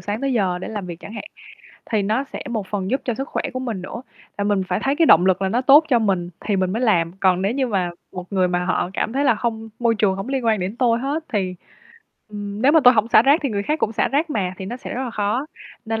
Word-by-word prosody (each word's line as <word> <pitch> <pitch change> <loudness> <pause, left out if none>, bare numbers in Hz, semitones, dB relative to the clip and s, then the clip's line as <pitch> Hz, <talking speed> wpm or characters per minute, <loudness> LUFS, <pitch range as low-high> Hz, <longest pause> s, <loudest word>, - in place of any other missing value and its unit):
sáng 205 +2 -4
tới 275 -1 0
giờ 190 -6 0
để - - -6
làm 205 -4 -5
việc 170 -1 -8
chẳng 210 - -10
hạn. 215 - -6 0.7
Thì 215 -3 +1
nó 220 +7 0
sẽ - - -8
một 220 -4 -3
phần 195 0 -3
giúp 265 - 0
cho 240 - -1
sức 270 +4 -5
khỏe - - -2
của 255 - -4
mình 230 -8 -4
nữa, 235 +6 -7 0.4
là 200 - 0
mình 205 -2 +1
phải 180 +3 -1
thấy 275 +2 0
cái 330 - +4
động 175 +3 +6
lực 190 0 +2
là 190 - +1
nó 230 +6 +1
tốt 285 +4 +6
cho 250 -5 +4
mình 190 -5 0
thì 205 -2 -1
mình 185 -1 0
mới 225 +4 -2
làm. 175 -8 +2
Còn 185 -1 +3
nếu 200 +4 +1
như 265 0 0
mà 190 -6 -1 0.2
một 180 -1 -6
người 185 -2 +2
mà 180 0 -1
họ 180 0 -1
cảm 220 - -1
thấy 280 +2 0
là 245 - +4
"Hông 225 -1 -3
môi 235 -1 +2
trường 205 -3 +2
hổng 195 +6 -5
liên 270 -2 -2
quan 220 -2 +2
gì 180 - -2
đến 200 +5 -7
tôi 235 -2 +2
hết 285 +5 -3
thì, 190 -4 -1 0.7
ừm, 205 +1 -6
nếu 280 - +5
mà 320 - +6
tôi 250 - +8
hổng 220 0 +2
xả 235 -2 +6
rác 280 +5 +4
thì 280 - 0
người 200 -2 -1
khác 305 +8 -1
cũng 220 - 0
xả - - +1
rác 300 +3 0
mà", 185 -6 -2
thì 190 - -6
nó 240 - -5
sẽ - - -7
rất 260 - -2
là 245 - -4
khó, 215 +6 -1 0.4
nên 225 0 -2
215 Hz, 295 wpm, -21 LUFS, 190-255 Hz, 0.7 s, tôi